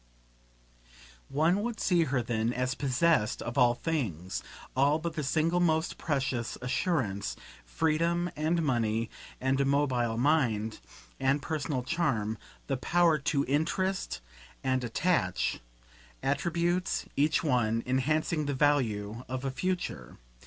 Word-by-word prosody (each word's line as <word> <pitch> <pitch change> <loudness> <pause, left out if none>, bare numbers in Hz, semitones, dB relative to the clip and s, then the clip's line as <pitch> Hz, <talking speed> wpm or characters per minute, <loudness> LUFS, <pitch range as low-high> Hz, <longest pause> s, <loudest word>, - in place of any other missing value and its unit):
One 160 +8 +2
would 235 0 -3
see 175 -3 +3
her 135 -4 0
then 115 0 0
as 125 +1 0
possessed 140 -2 +2
of 120 - -5
all 120 -1 +5
things, 105 - -2 0.3
all 140 +3 +4
but 165 +1 -4
the 155 - -2
single 160 +5 +1
most 160 -2 +1
precious 130 -5 -1
assurance; 125 - -1 0.3
freedom 165 - +1
and 160 +3 +1
money 115 -5 0 0.3
and 135 +1 +1
a - - +2
mobile 130 -5 +1
mind 120 -6 +1 0.4
and 135 +2 +2
personal 145 -3 -2
charm, 125 -9 0 0.3
the 135 - -1
power 170 +3 +3
to 140 0 0
interest 165 - -1 0.4
and 130 -1 +1
attach; 120 - 0 0.6
attributes, 170 +5 0
each 150 +2 +2
one, 115 -6 +1
enhancing 150 +4 +1
the 145 - -1
value 115 -6 +1
of 130 +1 -3
a 135 - 0
future. 175 - -3
140 Hz, 125 wpm, -30 LUFS, 120-160 Hz, 0.6 s, all